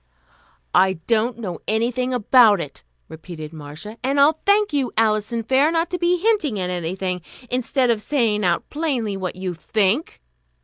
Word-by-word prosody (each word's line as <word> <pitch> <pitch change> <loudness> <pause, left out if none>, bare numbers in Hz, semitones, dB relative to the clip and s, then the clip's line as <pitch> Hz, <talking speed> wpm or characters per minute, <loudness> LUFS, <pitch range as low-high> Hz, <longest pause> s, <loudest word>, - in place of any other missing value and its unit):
"I 190 0 +4
don't 230 +1 +1
know 185 -8 -5
anything 240 +3 0
about 235 -3 +5
it," 140 - -7 0.2
repeated 160 -1 -9
Marcia, 155 +8 -9
"and 275 +2 0
I'll 300 +3 +4
thank 405 -3 +3
you, 275 -3 0
Alison 225 +1 +1
Fair, 265 +6 +3
not 330 0 0
to 360 - -2
be 350 +1 +2
hinting 355 - +1
at 180 -1 -2
anything, 180 +1 -3 0.3
instead 255 0 +1
of 220 -2 -1
saying 220 -4 0
out 175 -2 0
plainly 265 -10 -1
what 190 -2 -4
you 185 -1 -4
think." 210 - -1
225 Hz, 160 wpm, -21 LUFS, 185-275 Hz, 0.3 s, about